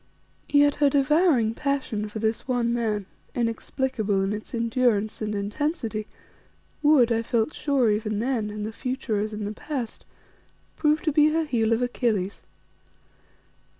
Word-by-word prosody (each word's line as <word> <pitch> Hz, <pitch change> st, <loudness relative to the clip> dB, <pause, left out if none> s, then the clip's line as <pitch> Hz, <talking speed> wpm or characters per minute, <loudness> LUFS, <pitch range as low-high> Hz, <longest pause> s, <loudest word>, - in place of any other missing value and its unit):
Yet 290 Hz, 0 st, +5 dB
her 285 Hz, -, +6 dB
devouring 280 Hz, -4 st, +3 dB
passion 260 Hz, -6 st, -2 dB
for 210 Hz, -, -7 dB
this 220 Hz, +2 st, -1 dB
one 240 Hz, -2 st, +1 dB
man, 215 Hz, -4 st, -1 dB, 0.3 s
inexplicable 230 Hz, -3 st, -1 dB
in 195 Hz, +2 st, -1 dB
its 210 Hz, 0 st, -7 dB
endurance 230 Hz, -3 st, +1 dB
and 210 Hz, -1 st, -2 dB
intensity, 215 Hz, +1 st, -2 dB, 0.7 s
would, 290 Hz, -6 st, +5 dB
I 230 Hz, 0 st, +2 dB
felt 230 Hz, +4 st, 0 dB
sure 270 Hz, -6 st, +2 dB
even 210 Hz, 0 st, -1 dB
then, 230 Hz, -2 st, -1 dB
in 210 Hz, 0 st, -5 dB
the 220 Hz, +1 st, -4 dB
future 250 Hz, -4 st, -2 dB
as 215 Hz, +1 st, -2 dB
in 210 Hz, -1 st, -4 dB
the 205 Hz, -, -3 dB
past, 250 Hz, -1 st, -5 dB, 0.7 s
prove 305 Hz, 0 st, +2 dB
to 315 Hz, -, +1 dB
be 300 Hz, +1 st, +5 dB
her 320 Hz, +1 st, +1 dB
heel 230 Hz, -6 st, +1 dB
of 230 Hz, +2 st, +2 dB
Achilles. 220 Hz, -6 st, -1 dB
230 Hz, 150 wpm, -25 LUFS, 215-275 Hz, 0.7 s, her